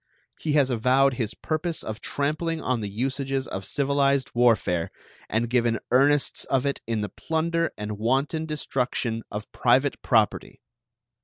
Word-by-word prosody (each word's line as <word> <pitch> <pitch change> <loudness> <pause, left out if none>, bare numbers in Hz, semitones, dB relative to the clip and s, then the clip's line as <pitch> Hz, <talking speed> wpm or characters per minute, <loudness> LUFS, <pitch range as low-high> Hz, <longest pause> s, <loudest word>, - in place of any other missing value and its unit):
He 155 - -1
has 140 -3 +3
avowed 130 +3 +3
his 115 -3 -3
purpose 160 +1 -3
of 110 +1 -6
trampling 155 +3 -1
on 130 -5 -1
the 105 - -3
usages 135 +4 -2
of 95 - -5
civilized 140 +4 +1
warfare, 110 -8 +2 0.4
and 115 +2 0
given 120 -1 +2
earnests 140 +3 +3
of 135 0 +1
it 140 - -1
in 115 -2 -1
the 105 - -3
plunder 165 +1 -1
and 105 0 -5
wanton 135 +7 0
destruction 125 -6 -2
of 105 0 -6
private 130 +3 +2
property. 110 -4 +1
130 Hz, 145 wpm, -25 LUFS, 115-145 Hz, 0.4 s, has